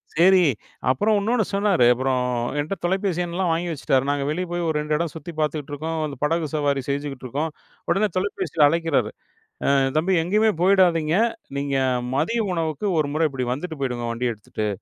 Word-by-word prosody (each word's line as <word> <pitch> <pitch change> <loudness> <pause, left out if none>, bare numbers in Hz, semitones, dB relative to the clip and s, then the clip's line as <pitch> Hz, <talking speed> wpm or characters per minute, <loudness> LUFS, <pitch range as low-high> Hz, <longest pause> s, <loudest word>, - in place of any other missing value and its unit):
சரி. 185 +3 +6 0.5
அப்புறம் 205 +12 +2
இன்னொன்னு 220 0 +1
சொன்னாரு, 200 -9 +3
அப்புறம் 130 +1 0 0.4
என்ட்ட 155 +7 -2
தொலைபேசி 190 0 0
எண்ணெலாம் 175 +1 -1
வாங்கி 170 +2 -1
வச்சுட்டாரு 135 -3 +1
நாங்க 145 -1 0
வெளியே 180 +4 -2
போய் 175 0 -1
ஒரு 160 - 0
2 150 0 -2
இடம் 165 0 -1
சுத்தி 160 +2 -7
பார்த்துட்டுருக்கோம் 155 +1 -2
அந்த 145 - -5
படகு 160 +1 +1
சவாரி 145 -2 +1
செஞ்சுகிட்டுருக்கோம், 140 +1 -3 0.4
உடனே 195 +5 +3
தொலைபேசியில 185 -5 +1
அழைக்கிறாரு, 165 +1 +1 0.6
"அ - - +3 0.2
தம்பி 175 +5 +2
எங்கேயுமே 210 +5 +3
போயிடாதீங்க. 175 -4 +4 0.4
நீங்க 140 0 -1 0.4
மதிய 225 +11 +1
உணவுக்கு 165 +1 -2
ஒரு 145 -2 0
முறை 160 +1 +2
இப்டி 130 -2 -3
வந்துட்டு 160 +2 -6
போயிடுங்க 125 -3 -2
வண்டிய 120 +1 -1
எடுத்துட்டு". 105 0 -5
160 Hz, 160 wpm, -23 LUFS, 140-180 Hz, 0.6 s, சரி